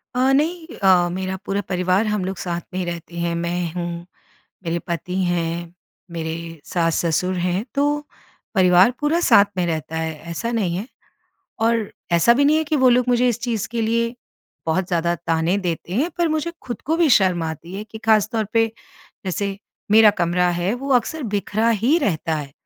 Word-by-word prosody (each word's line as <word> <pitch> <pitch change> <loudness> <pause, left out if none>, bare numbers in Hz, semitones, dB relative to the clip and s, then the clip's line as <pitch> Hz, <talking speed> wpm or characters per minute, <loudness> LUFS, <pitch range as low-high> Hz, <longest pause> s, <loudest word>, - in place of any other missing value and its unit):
अ, 260 +2 +3
नहीं 320 +3 0
अ, 185 -3 +4
मेरा 190 +1 -3
पूरा 200 +1 -1
परिवार 185 +3 +1
हम 210 -3 -1
लोग 190 -1 -4
साथ 175 -1 -3
में 185 - -2
ही 180 - -2
रहते 170 0 -6
हैं। 170 0 -1
मैं 170 0 -2
हूँ, 175 -1 -4 0.6
मेरे 170 +1 -1
पति 170 +2 -3
हैं, 170 0 -2 0.4
मेरे 160 -1 -4 0.3
सास-ससुर 170 +1 0
हैं, 180 +4 0
तो 290 +1 0 0.5
परिवार 185 +3 +6
पूरा 310 +4 +1
साथ 200 -3 +8
में 180 - +1
रहता 160 -1 -3
है, 160 0 -2 0.2
ऐसा 230 +8 -3
नहीं 185 -7 0
है। 205 +5 -4 0.8
और 230 -2 0 0.2
ऐसा 170 +8 +5
भी 280 +2 +3
नहीं 300 +2 +4
है 315 - +1
कि 305 0 0
वो 260 -2 +5
लोग 250 0 +3
मुझे 245 0 +3
इस 240 -1 -1
चीज़ 230 -5 -2
के 235 0 -3
लिए, 230 +2 0 0.5
बहुत 175 +3 +1
ज़्यादा 170 -1 +1
ताने 165 +2 0
देते 175 -1 -4
हैं, 290 - +1
पर 340 - +2
मुझे 315 +2 -1
खुद 240 - -6
को 320 +2 +1
भी 335 -3 +3
शर्म 180 -3 +1
आती 160 +3 -6
है 210 +2 -5
कि 220 +1 -10
ख़ास 220 -2 +3
तौर 220 -1 0
पे, 225 0 +4 0.6
जैसे 195 +1 -2 0.3
मेरा 215 0 +8
कमरा 175 +1 +2
है, 180 +4 0
वो 275 +2 -5
अक्सर 295 +5 0
बिखरा 215 +4 0
ही 285 +8 +4
रहता 165 - -1
है। 140 -2 -6
190 Hz, 190 wpm, -21 LUFS, 170-235 Hz, 0.8 s, साथ